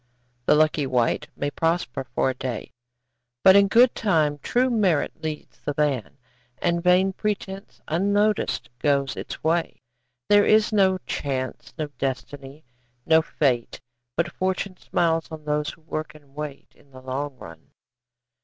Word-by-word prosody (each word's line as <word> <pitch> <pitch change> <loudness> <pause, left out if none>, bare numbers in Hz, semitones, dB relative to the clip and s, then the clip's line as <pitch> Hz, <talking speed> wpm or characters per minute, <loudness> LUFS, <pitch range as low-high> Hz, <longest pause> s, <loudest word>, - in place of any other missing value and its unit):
The - - +6
lucky 155 -2 +2
wight 125 -3 +1
may 145 0 -2
prosper 165 -6 -1
for 130 - +2
a - - -5
day, 125 -3 -5 0.7
But 190 - +8
in 200 0 +6
good 240 +4 +5
time 155 -8 +1
true 250 - +1
merit 185 -9 +1
leads 155 -1 -6
the 145 - -3
van 140 -5 -1 0.4
And 170 0 0
vain 185 +2 +4
pretence, 200 -1 -4
unnoticed, 205 - +1
goes 140 -1 +1
its - - -7
way. 165 +1 0 0.5
There 205 0 +6
is 215 +1 +4
no 190 -2 +4
Chance, 130 -2 -4
no 155 - -1
Destiny, 135 +2 -5 0.4
no 160 0 +5
Fate, 130 -7 -1 0.4
But 170 +1 0
Fortune 185 +1 -2
smiles 165 -2 0
on 155 -2 -9
those 150 0 0
who - - -11
work 155 -1 -5
and 145 -3 -18
wait, 150 -1 -7
In 140 - -24
the 130 -1 -13
long 135 +1 -4
run. 80 -7 -12
155 Hz, 145 wpm, -24 LUFS, 140-190 Hz, 0.7 s, But